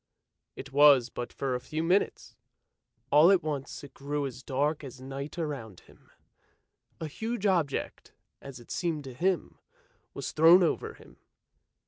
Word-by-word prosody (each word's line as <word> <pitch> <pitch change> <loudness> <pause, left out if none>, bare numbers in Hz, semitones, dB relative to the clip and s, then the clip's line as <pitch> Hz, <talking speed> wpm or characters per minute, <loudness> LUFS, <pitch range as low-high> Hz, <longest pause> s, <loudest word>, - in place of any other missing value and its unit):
It 135 - -10
was 140 -4 +6
but 120 - -6
for 135 -2 -3
a 125 - -1
few 155 +5 -4
minutes; 180 +4 0 0.8
all 150 +4 +7
at 195 -3 +4
once 145 -3 -5
it 145 - -12
grew 145 +1 -3
as 130 -1 -7
dark 145 +4 -1
as 130 -2 -9
night 135 +4 -7
around 135 - -5
him; - - -22 0.9
a 160 - -4
huge 220 +7 -4
object, 170 -8 -1 0.3
as 140 -2 -10
it 120 - -14
seemed 165 -4 -2
to 130 -2 -9
him, 180 +8 -1 0.6
was - - -4
thrown 165 +4 +7
over 165 - -1
him. - - -18
145 Hz, 150 wpm, -29 LUFS, 135-165 Hz, 0.9 s, all